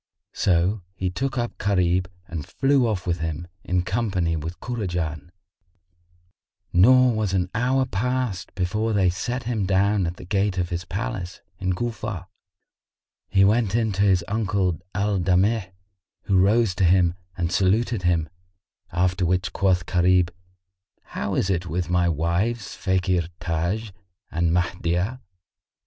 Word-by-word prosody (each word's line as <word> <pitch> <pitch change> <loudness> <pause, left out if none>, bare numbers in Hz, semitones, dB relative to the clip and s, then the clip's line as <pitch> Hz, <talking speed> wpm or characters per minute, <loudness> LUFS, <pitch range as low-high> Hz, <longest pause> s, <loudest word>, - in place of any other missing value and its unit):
So 95 +3 +1
he 95 -1 -2
took 135 +8 -2
up 120 -1 -3
Gharib 90 -2 +2 0.2
and 80 -3 -5
flew 135 - +2
off 100 -5 -2
with 85 -1 -1
him, 80 +1 -4 0.2
in 90 0 0
company 95 -5 0
with 80 +3 -5
Kurajan; 85 - -3 1.4
nor 125 +7 +6
was 110 -3 -1
an 90 -1 0
hour 130 +3 +2
past 125 -3 -2
before 105 +4 0
they 95 -3 +3
set 120 +7 -3
him 115 -5 -1
down 100 0 +2
at 85 +1 -5
the - - -10
gate 100 0 0
of 90 -1 0
his 85 -1 -3
palace, 95 -2 -4 0.2
in 95 -1 0
Cufa. 110 -2 -4 1.0
He 95 0 +5
went 110 0 +2
in 115 -2 +1
to 95 0 -1
his 95 -4 +3
uncle 100 -6 0 0.2
Al 100 0 +1
Damigh, 95 +3 +2 0.5
who 100 - 0
rose 105 +2 +3
to - - +2
him 90 -1 +4 0.2
and 85 -1 -1
saluted 100 +4 +2
him; 85 -3 +1 0.6
after 90 +1 +1
which 90 +1 0
quoth 95 -4 +2
Gharib, 90 0 +3 0.8
"How - - -2
is 95 - +1
it 90 -1 -1
with 85 +2 -2
my 90 -1 +3
wives 85 +8 -1
Fakhr 90 -2 0
Taj[FN#53] 85 +6 -2 0.4
and 85 0 +1
Mahdiyah?" 90 +5 0
95 Hz, 140 wpm, -24 LUFS, 90-105 Hz, 1.4 s, nor